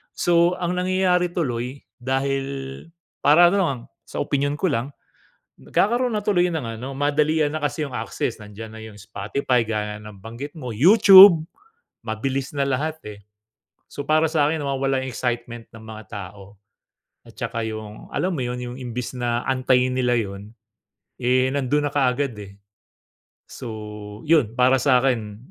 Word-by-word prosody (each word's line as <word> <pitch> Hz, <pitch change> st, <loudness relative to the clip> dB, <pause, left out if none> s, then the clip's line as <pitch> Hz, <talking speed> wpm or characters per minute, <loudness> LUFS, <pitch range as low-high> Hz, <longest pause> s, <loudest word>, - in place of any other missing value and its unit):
So, 175 Hz, +1 st, +3 dB
ang 180 Hz, 0 st, -1 dB
nangyayari 180 Hz, -1 st, +1 dB
tuloy, 130 Hz, -5 st, -3 dB, 0.2 s
dahil 135 Hz, +2 st, -1 dB, 0.8 s
para 165 Hz, +4 st, +7 dB
ano 200 Hz, -, +1 dB
lang, 135 Hz, -7 st, -1 dB, 0.2 s
sa -, -, -7 dB
opinyon 145 Hz, 0 st, -1 dB
ko 190 Hz, -, +1 dB
lang, 130 Hz, +3 st, -2 dB, 0.7 s
nagkakaroon 235 Hz, -, +1 dB
na 210 Hz, -, -3 dB
tuloy 180 Hz, -3 st, +2 dB
ng 120 Hz, -10 st, -4 dB
ano 135 Hz, +1 st, -6 dB
madalian 150 Hz, +1 st, +1 dB
na 155 Hz, -, -3 dB
kasi 150 Hz, +1 st, -1 dB
yong 140 Hz, -, -8 dB
access. 115 Hz, 0 st, -3 dB
Nandiyan 105 Hz, +2 st, -10 dB
na 110 Hz, -, -10 dB
yong 110 Hz, -2 st, -11 dB
Spotify, 120 Hz, +7 st, -1 dB
gaya 105 Hz, -1 st, -3 dB
ng 105 Hz, -1 st, -11 dB
banggit 135 Hz, +8 st, -8 dB
mo. 125 Hz, -6 st, -6 dB
YouTube, 190 Hz, -, +8 dB, 0.6 s
mabilis 130 Hz, +5 st, -3 dB
na 140 Hz, -, +2 dB
lahat, 150 Hz, +4 st, -2 dB
eh. 105 Hz, -1 st, -9 dB, 0.7 s
So, 145 Hz, -, -7 dB
para 155 Hz, +1 st, +3 dB
sa 155 Hz, -3 st, +2 dB
akin 160 Hz, -1 st, -2 dB
nawawala 135 Hz, -1 st, -1 dB
excitement 120 Hz, -2 st, -4 dB
ng 110 Hz, -, -12 dB
mga 110 Hz, 0 st, -9 dB
tao. 100 Hz, 0 st, -9 dB, 0.7 s
At -, -, -17 dB
tsaka, 115 Hz, -1 st, -3 dB
yung 110 Hz, -1 st, -8 dB
alam 185 Hz, 0 st, 0 dB
mo 130 Hz, -, -2 dB
yun, 125 Hz, 0 st, -3 dB
yung 125 Hz, 0 st, -6 dB
imbis 125 Hz, 0 st, -5 dB
na 120 Hz, -1 st, -2 dB
antayin 130 Hz, -1 st, +2 dB
nila 125 Hz, -2 st, +1 dB
yun, 100 Hz, -1 st, -5 dB, 0.7 s
eh, 130 Hz, +1 st, +2 dB
nandun 145 Hz, +2 st, 0 dB
na -, -, -17 dB
kaagad, 135 Hz, -2 st, +1 dB
eh. 100 Hz, -1 st, -10 dB, 0.9 s
So, 105 Hz, -2 st, -8 dB
yun 145 Hz, -8 st, +2 dB
para 130 Hz, +1 st, +4 dB
sakin, 125 Hz, -6 st, +1 dB
130 Hz, 155 wpm, -23 LUFS, 115-150 Hz, 0.9 s, YouTube